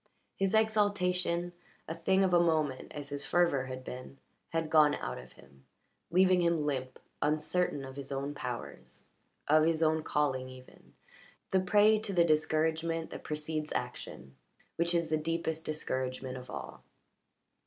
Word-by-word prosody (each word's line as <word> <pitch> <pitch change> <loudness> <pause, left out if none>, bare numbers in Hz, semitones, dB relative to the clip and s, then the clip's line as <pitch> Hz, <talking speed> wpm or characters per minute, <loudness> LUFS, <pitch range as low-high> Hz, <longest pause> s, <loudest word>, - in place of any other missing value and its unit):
His 195 +2 +1
exaltation 180 -5 +1 0.3
a 160 - -3
thing 190 +4 +2
of 185 -2 +2
a 175 - +7
moment, 155 -6 +1
as 145 -1 -7
his 145 0 -3
fervour 170 -7 +2
had 130 0 -6
been 130 +2 -8 0.3
had 165 -1 -2
gone 150 -2 +6
out 60 0 -4
of 65 0 -13
him, 70 0 -19 0.5
leaving 185 +1 +4
him 170 -3 +2
limp, 130 -3 -2 0.2
uncertain 150 0 0
of 135 +1 -9
his 140 -1 -6
own 140 +1 -2
powers, 125 -4 -6 0.4
of 155 +1 +5
his 165 0 +2
own 160 0 +3
calling, 130 -4 0
even 130 0 -15 0.6
the 190 - +4
prey 210 +3 +5
to 210 -2 -4
the 175 -2 +5
discouragement 160 +1 +1
that - - -7
precedes 150 0 -3
action, 65 0 -5 0.4
which 170 +1 +1
is 170 -1 +1
the 155 - +2
deepest 160 0 -2
discouragement 130 -4 -3
of 125 -1 -9
all. - - -7
155 Hz, 155 wpm, -31 LUFS, 140-170 Hz, 0.6 s, a